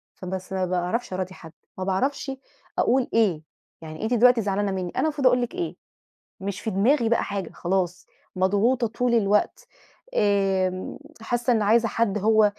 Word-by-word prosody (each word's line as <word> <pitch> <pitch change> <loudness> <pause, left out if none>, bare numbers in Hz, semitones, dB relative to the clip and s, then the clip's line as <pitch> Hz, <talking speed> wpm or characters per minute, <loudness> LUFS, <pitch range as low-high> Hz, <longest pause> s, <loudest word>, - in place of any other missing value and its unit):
فبس 185 +1 -6
ما 190 -1 0
باعرَفش 185 +5 -2
أراضي 185 0 -3
حد، 160 -3 -12 0.3
ما 185 - -3
باعرفش 270 +9 -1 0.5
أقول 255 +1 +2
إيه، 195 -9 +2 0.4
يعني 155 +3 -8
أنتِ 220 +3 0
دلوقتي 245 0 +5
زعلانة 200 0 0
منّي 185 -2 -3
أنا - - -1
المفروض 295 -4 +2
أقول 250 0 +4
لِك 245 - -3
إيه، 355 -2 -3 0.6
مش 200 +1 -4
في 220 - -2
دماغي 225 +5 +2
بقى 235 - +2
حاجة، 195 -4 -4
خلاص، 180 0 -1 0.3
مضغوطة 205 +7 +2
طُول 240 +2 -1
الوقت، 210 - +1 0.5
آمم، 195 -2 +1 0.2
حاسّة 240 +2 0
إن 220 - +1
عايزة 225 +3 +4
حَد 220 -2 0
هو 215 +1 +4
205 Hz, 160 wpm, -25 LUFS, 185-240 Hz, 0.6 s, دلوقتي